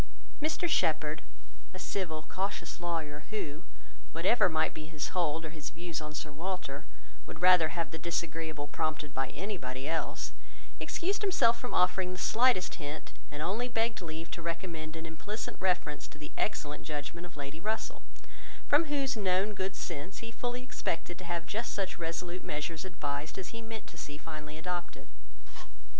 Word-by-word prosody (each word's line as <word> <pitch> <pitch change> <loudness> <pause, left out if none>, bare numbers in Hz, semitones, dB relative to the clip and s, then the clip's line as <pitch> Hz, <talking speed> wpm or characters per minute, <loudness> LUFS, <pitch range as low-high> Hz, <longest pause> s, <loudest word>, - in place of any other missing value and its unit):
Mr 315 +3 +2
Shepherd, - - +3 0.5
a - - -3
civil, 170 -5 -1
cautious 190 -3 -1
lawyer, 160 -4 -1
who, 165 -7 -2 0.5
whatever 185 +5 +5
might 160 -1 +3
be 155 0 -6
his 155 -2 -2
hold 165 -2 +2
or 155 - -4
his 155 -3 -4
views 170 -1 -3
on 150 0 -5
Sir 150 0 -3
Walter, 165 -2 -3 0.4
would - - -6
rather 180 -3 +9
have 165 +2 -1
the 160 - -4
disagreeable 165 -3 -1
prompted 155 -1 -1
by 135 0 +1
anybody 140 -10 -3
else, 165 +1 0 0.5
excused 390 +4 +1
himself 235 - +5
from 250 - -2
offering 180 0 +4
the - - -4
slightest 225 -6 +4
hint, 145 +2 -4 0.2
and 145 +1 -3
only 215 +8 +1
begged 225 -3 +1
leave 165 -1 -4
to 170 - -3
recommend 165 -2 -2
an 165 0 -4
implicit 185 +7 -4
reference 180 -5 +2
to - - -13
the 150 0 -7
excellent 150 -8 0
judgement 155 +3 -3
of 170 - -15
Lady 140 +2 -4
Russell, 215 +4 -1 0.7
from 295 +3 +6
whose 280 -3 +2
known 195 0 +3
good 190 -1 -1
sense 170 +3 -4
he 230 - -4
fully 245 +2 -2
expected 175 -8 -2
to 185 - -7
have 170 -1 -1
just 225 +7 -1
such 195 -3 -1
resolute 175 +2 -2
measures 150 +2 -2
advised 150 -4 -2
as 190 - -3
he 230 - -6
meant 225 -1 -5
to 170 - -9
see 145 0 -5
finally 155 -1 -6
adopted. 175 +1 -3
170 Hz, 165 wpm, -33 LUFS, 155-195 Hz, 0.7 s, rather